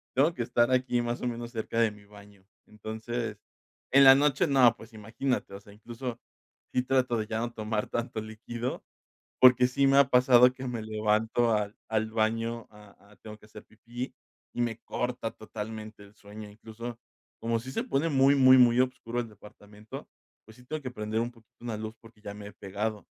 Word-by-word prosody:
tengo 150 +6 +3
que 120 - -2
estar 120 +1 +2
aquí, 125 -1 +2
más 120 0 -3
o - - 0
menos, 120 0 -4
cerca 115 -1 -3
de 115 -1 +4
mi 105 -1 -15
baño. 100 -1 -17 0.2
Entonces, 110 +1 -5 0.5
en 140 +1 +7
la 135 0 +10
noche 145 +3 +3
no, 130 -6 +5
pues 115 +1 -14
imagínate, 110 +1 -3
o - - -8
sea, 100 0 -16
incluso 120 +3 -7 0.5
sí, 125 - +1
trato 130 -2 +1
de 110 - -2
ya 110 0 -2
no 120 +1 -2
tomar 110 -1 -2
tanto 115 -2 -3
líquido, 115 +3 -6 0.6
porque 125 0 +7
sí 140 +2 +1
me 135 0 +4
ha 140 -1 +6
pasado 125 0 +6
que 130 0 -8
me 120 -2 -4
levanto 110 +2 +1
al 105 -1 -1
al 110 0 0
baño 115 +1 -1
a 105 -1 -18
a, - - -18
tengo 110 -1 -11
que 110 - -19
hacer 105 0 -13
pipí 120 +3 -8 0.4
y - - -2
me 115 -2 -1
corta 125 0 -3
totalmente 110 -1 -8
el 100 +1 -18
sueño. 105 +1 -11
Incluso 115 +3 -9 0.4
como 115 0 -1
sí 130 +3 -8
se - - -2
pone 140 +5 0
muy, 135 -1 +5
muy, 130 -1 +7
muy 120 -1 +5
obscuro 125 -2 -3
el 120 - -7
departamento, 105 0 -12 0.4
pues 110 - -16
sí, 125 - -17
tengo 155 +4 -4
que 130 - -5
prender 110 -2 -3
un 120 +1 -3
poquito 115 0 -24
una 115 -3 -4
luz 110 0 -6
porque 115 -2 -18
ya 100 -1 -7
me 105 0 -9
he 105 - -11
pegado, 105 0 -4
115 Hz, 200 wpm, -28 LUFS, 110-125 Hz, 0.6 s, la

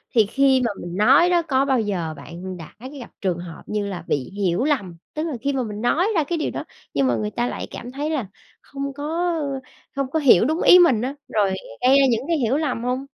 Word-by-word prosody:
thì 220 - +6
khi 265 +4 +3
mà 230 - 0
mình 175 +1 -6
nói 270 - +5
đó, 350 -1 +3
có 275 -4 +1
bao 265 -2 +2
giờ 185 -7 -2
bạn 175 +5 -8
đã 165 -3 -11 0.3
gặp 245 - -10
trường 185 -3 0
hợp 170 -2 -9
như 210 -1 -2
là 180 -4 -5
bị 135 -3 -1
hiểu 195 +1 0
lầm? 205 - -1 0.2
Tức 305 - -2
là 305 - -3
khi 280 +2 0
mà 260 - 0
mình 210 -1 -6
nói 315 +10 +2
ra 320 - +3
cái 335 +3 -2
điều 310 - -2
đó, - - -4 0.3
nhưng 135 -1 +2
mà 120 - +2
người 105 -1 -2
ta 240 - -1
lại - - -5
cảm 245 - -8
thấy 290 +4 -3
là 275 -10 -2 0.3
không 275 0 -6
có, 325 +5 -1
ơ 275 -3 -3 0.4
không 275 -2 -1
có 320 - +1
hiểu 235 - +6
đúng 315 +5 0
ý 360 - +8
mình 265 -11 +5
á, 265 +3 -3
rồi 200 -3 +1 0.3
gây 260 +2 +5
ra 275 - +5
những 230 +2 0
cái 335 -2 +1
hiểu 255 +1 +1
lầm 280 -7 -2
hông? 255 +2 -2
255 Hz, 250 wpm, -22 LUFS, 200-285 Hz, 0.4 s, ý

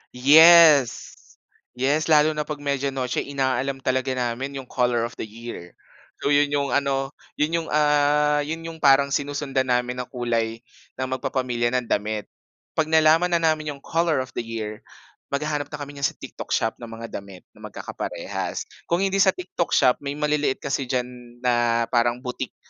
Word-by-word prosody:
Yes. 155 0 +7 0.6
Yes, 140 +5 0
lalo 155 0 +5
na 150 -1 -3
'pag 150 - -4
Media 140 -1 -1
Noche 130 -2 -2
inaalam 135 -1 -1
talaga 130 +1 0
namin 130 +3 -3
'yong 135 - -6
color 120 -2 +1
of 120 - -7
the - - -4
year. 110 -5 -10 0.5
So, 145 - +1
'yon 145 0 +4
'yong 140 -1 0
ano, 135 -1 0 0.3
'yon 150 +3 0
'yong, 165 -1 -1
ah, 150 0 +3
'yon 160 +3 -5
'yong 165 -1 -8
parang 140 0 +5
sinusundan 140 -2 -1
namin 125 0 0
na 125 - -8
kulay 115 -2 -2 0.3
ng 130 0 -3
magpapamilya 125 -2 -1
ng 125 -1 0
damit. 105 0 -1 0.5
'Pag 155 -1 0
nalaman 160 +2 +4
na 170 - +3
namin 155 -1 +1
'yong 140 - -19
color 165 -5 0
of 130 - -13
the - - -2
year 110 -2 -5 0.5
maghahanap 145 0 -2
na - - -7
kami 145 -1 -7
niyan 140 0 0
sa - - -8
TikTok - - -5
Shop 110 0 -1
ng 120 - -8
mga 115 0 -9
damit 100 -2 -13
na - - -22
magkakaparehas. - - -5 0.2
Kung 175 +3 +1
hindi 195 0 0
sa 190 -1 +4
TikTok 180 -1 -2
Shop, 125 -2 +4
may 140 0 -5
maliliit 150 -2 0
kasi 140 -2 -2
diyan 125 -1 -1 0.4
na 120 -1 +2
parang 120 +1 +1
boutique 125 -1 -5
140 Hz, 175 wpm, -23 LUFS, 125-150 Hz, 0.6 s, Yes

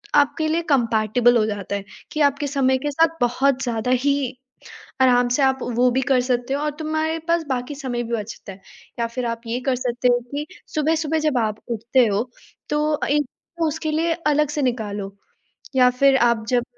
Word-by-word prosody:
आपके 295 +2 +3
लिए 325 +2 +1
कम्पैटिबल 235 -2 +3
हो 215 - +2
जाता 205 -2 -3
है 200 - -4 0.3
कि 305 - -4
आपके 285 0 +2
समय 265 -2 +2
के 290 +3 -3
साथ 325 +3 +2
बहुत 260 +2 +2
ज़्यादा 240 0 -1
ही 285 0 +3 0.9
आराम 245 -1 +4
से 285 - +1
आप 265 0 +2 0.2
वो 250 +1 +4
भी 260 +2 +1
कर 255 -2 +4
सकते 245 +1 -1
हो 280 - 0
और 300 - 0
तुम्हारे 315 +1 -1
पास 335 -1 +2
बाकी 255 +3 -2
समय 255 -4 -3
भी 235 0 -5
बचता 210 -2 -7
है। 190 - -17 0.4
या 235 - +1
फिर 245 +2 -4
आप 230 -1 -3
ये 235 +2 -2
कर 265 -2 +2
सकते 250 0 -1
हो 245 0 +4
कि 290 +1 -3 0.3
सुबह-सुबह 315 +1 +1
जब 305 -4 0
आप 215 -2 -1
उठते 235 +2 +2
हो, 215 +4 -1 0.4
तो 300 +1 +1
अ, - - -1
एक 295 +1 +2 0.4
उसके 310 +1 -2
लिए 330 +2 +1
अलग 300 -1 +2
से 295 - -2
निकालो 210 -6 -2 0.6
या 250 -1 +6
फिर 270 +2 +4
आप 235 -3 +2
जब 245 -1 +2
255 Hz, 195 wpm, -22 LUFS, 235-295 Hz, 0.9 s, या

